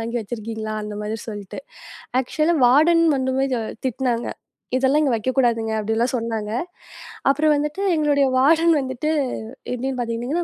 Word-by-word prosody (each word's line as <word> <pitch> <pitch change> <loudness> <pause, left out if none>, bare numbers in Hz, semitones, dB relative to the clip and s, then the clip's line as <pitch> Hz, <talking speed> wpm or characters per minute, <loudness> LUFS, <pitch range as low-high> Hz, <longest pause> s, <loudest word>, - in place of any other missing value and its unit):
வாங்கி 230 +2 -3
வச்சிருக்கீங்களா! 220 0 -5
அந்த 210 0 -6
மாதிரி 210 +1 -3
சொல்லிட்டு. 205 -3 -7 0.6
ஆக்ச்சுலா 305 +6 0
வார்டன் 320 +7 +5
வந்துமே 260 0 0 0.4
திட்டுனாங்க. 245 -1 -1 0.5
"இதெல்லாம் 265 +3 +3
இங்க 275 -5 +2
வைக்கக் 255 +4 -3
கூடாதுங்க" 230 -3 +2
அப்பிடிலாம் 225 +4 0
சொன்னாங்க. 225 -3 -3 0.8
அப்புறம் 300 +2 +3
வந்துட்டு 300 +6 -2
எங்களுடைய 290 -2 +3
வார்டன் 325 +5 +5
வந்துட்டு 260 +3 -3 0.6
எப்பிடின்னு 255 +1 -3
பாத்தீங்கன்னா, 240 +8 -2
255 Hz, 125 wpm, -22 LUFS, 225-290 Hz, 0.8 s, வார்டன்